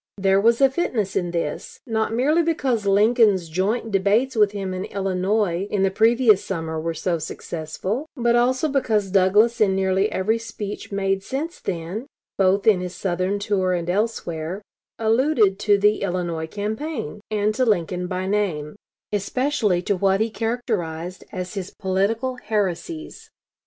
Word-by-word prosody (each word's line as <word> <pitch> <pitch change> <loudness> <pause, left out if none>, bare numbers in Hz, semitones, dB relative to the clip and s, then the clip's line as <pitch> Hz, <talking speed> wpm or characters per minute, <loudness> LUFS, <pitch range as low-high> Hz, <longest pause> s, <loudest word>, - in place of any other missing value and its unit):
There 195 0 +3
was 230 +4 +3
a 270 - +7
fitness 230 - -1
in 175 - 0
this, 170 -4 -4
not 220 -2 -1
merely 280 +9 +2
because 265 -10 0
Lincoln's 205 -2 +4
joint 200 +8 -1
debates 205 +7 +2
with 210 -2 +4
him 195 -2 -4
in 185 +1 -3
Illinois 195 -1 0
in 200 -2 0
the 195 - +2
previous 225 0 +4
summer 160 -3 -3
were 165 0 -3
so 170 +1 -1
successful, 170 - -4
but 235 -1 +2
also 255 +5 +2
because 225 -9 0
Douglas 205 +5 +4
in 195 -3 +4
nearly 190 +2 +1
every 215 +5 0
speech 215 -3 -7
made 195 -1 0
since 295 - -4
then, 180 +8 -4 0.3
both 195 +1 +2
in 210 -4 +5
his 180 0 -5
Southern 185 +1 -1
tour 195 -2 0
and 175 0 -1
elsewhere, 185 -3 -2 0.3
alluded 225 -3 +2
to 205 -1 +3
the 210 +1 +2
Illinois 175 -4 -2
campaign, 220 - -4
and 215 0 +1
to 255 - +1
Lincoln 180 -5 0
by 185 0 -3
name, 190 -6 -1 0.4
especially 210 -3 0
to 200 - +1
what 195 +1 +2
he 220 +1 0
characterized 195 -8 -3
as 185 -2 -5
his 195 -2 -4
political 215 +7 -1
heresies. 215 - -3
200 Hz, 150 wpm, -23 LUFS, 185-225 Hz, 0.4 s, a